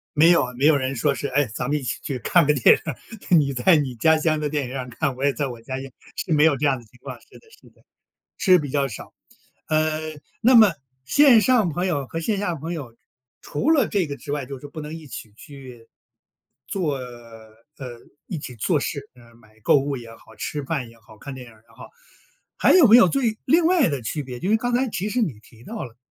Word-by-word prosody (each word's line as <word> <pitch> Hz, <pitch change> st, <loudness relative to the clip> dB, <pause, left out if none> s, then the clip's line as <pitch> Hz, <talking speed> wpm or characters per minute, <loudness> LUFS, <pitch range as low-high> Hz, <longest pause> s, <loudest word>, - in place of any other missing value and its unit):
没 160 Hz, +3 st, +6 dB
有 170 Hz, -, +4 dB
啊， 125 Hz, 0 st, -5 dB
没 135 Hz, -, +1 dB
有 155 Hz, 0 st, +6 dB
人 135 Hz, -1 st, -2 dB
说 140 Hz, +4 st, +1 dB
是， 140 Hz, -, -4 dB
诶， 140 Hz, +2 st, +1 dB
咱 125 Hz, -, -3 dB
们 150 Hz, -, 0 dB
一 145 Hz, -, -5 dB
起 120 Hz, -, -3 dB
去 140 Hz, -5 st, -4 dB
看 170 Hz, +7 st, +3 dB
个 150 Hz, -, +3 dB
电 130 Hz, -, +5 dB, 0.5 s
影， 170 Hz, -3 st, +6 dB
你 140 Hz, -2 st, 0 dB
在 130 Hz, +8 st, +4 dB
你 135 Hz, -4 st, -2 dB
家 160 Hz, +7 st, +3 dB
乡 155 Hz, -1 st, 0 dB
的 150 Hz, -, -2 dB
电 145 Hz, -1 st, -1 dB
影 -, -, -7 dB
院 130 Hz, -1 st, -5 dB
看， 135 Hz, +2 st, -2 dB
我 130 Hz, -, -6 dB
也 140 Hz, -, +3 dB
在 145 Hz, 0 st, -2 dB
我 120 Hz, -3 st, -9 dB
家 130 Hz, +3 st, -5 dB
乡， 135 Hz, 0 st, -8 dB, 0.3 s
是 165 Hz, -, -2 dB
没 150 Hz, -1 st, +4 dB
有 155 Hz, -4 st, +3 dB
这 150 Hz, -, -1 dB
样 135 Hz, -2 st, +2 dB
的 120 Hz, -, -13 dB
情 120 Hz, +3 st, -23 dB
况， -, -, -7 dB
是 -, -, -18 dB
的 -, -, -26 dB
是 -, -, -19 dB
的， -, -, -29 dB, 0.6 s
是 185 Hz, -2 st, +5 dB
比 145 Hz, -4 st, -5 dB
较 140 Hz, 0 st, +1 dB
少。 110 Hz, -, -10 dB, 0.6 s
呃， 155 Hz, 0 st, 0 dB, 0.3 s
那 250 Hz, +3 st, +4 dB
么 220 Hz, -5 st, +7 dB, 0.3 s
线 265 Hz, -, +6 dB
上 235 Hz, -5 st, +3 dB
朋 175 Hz, +4 st, -2 dB
友 145 Hz, -7 st, -1 dB
和 165 Hz, -, -5 dB
线 200 Hz, +5 st, -1 dB
下 195 Hz, -4 st, -1 dB
朋 160 Hz, +2 st, -6 dB
友， 130 Hz, -9 st, -7 dB, 0.4 s
除 230 Hz, -, -2 dB
了 285 Hz, -8 st, +3 dB
这 190 Hz, -5 st, 0 dB
个 140 Hz, -, -6 dB
之 -, -, -10 dB
外， 145 Hz, -3 st, -3 dB
就 135 Hz, 0 st, -7 dB
是 145 Hz, -, -10 dB
不 155 Hz, +2 st, -8 dB
能 150 Hz, +1 st, -7 dB
一 160 Hz, -2 st, -10 dB
起 110 Hz, -3 st, -9 dB
去， 130 Hz, -4 st, -13 dB, 0.8 s
做 165 Hz, -8 st, -2 dB
呃， 115 Hz, -3 st, -12 dB, 0.7 s
一 170 Hz, -, -5 dB
起 130 Hz, -4 st, -8 dB
做 150 Hz, -, 0 dB
事， 140 Hz, 0 st, -5 dB
呃， 120 Hz, -1 st, -19 dB
买 110 Hz, -2 st, -23 dB
购 -, -, +4 dB
物 140 Hz, 0 st, -2 dB
也 115 Hz, -2 st, -10 dB
好， 110 Hz, -1 st, -18 dB
吃 145 Hz, +7 st, -4 dB
饭 135 Hz, -4 st, -3 dB
也 115 Hz, 0 st, -18 dB
好， 110 Hz, 0 st, -18 dB
看 140 Hz, +3 st, -8 dB
电 130 Hz, -1 st, -10 dB
影 120 Hz, -, -15 dB
也 110 Hz, +1 st, -24 dB
好， -, -, -12 dB, 0.7 s
还 -, -, +4 dB
有 360 Hz, -7 st, +7 dB
没 225 Hz, +1 st, +8 dB
有 230 Hz, -7 st, +7 dB
最 230 Hz, -1 st, 0 dB
另 320 Hz, +5 st, +3 dB
外 345 Hz, -6 st, +3 dB
的 140 Hz, -4 st, -2 dB
区 145 Hz, +7 st, -3 dB
别， 125 Hz, -2 st, -8 dB
就 190 Hz, -, -2 dB
是 220 Hz, -, +5 dB
刚 245 Hz, +2 st, -2 dB
才 250 Hz, +2 st, +1 dB
其 205 Hz, -2 st, -3 dB
实 250 Hz, -, 0 dB
你 145 Hz, -, -2 dB
提 115 Hz, +1 st, -19 dB
到 225 Hz, -, -6 dB
了， 120 Hz, -3 st, -12 dB
145 Hz, 265 characters per minute, -23 LUFS, 125-175 Hz, 0.8 s, 没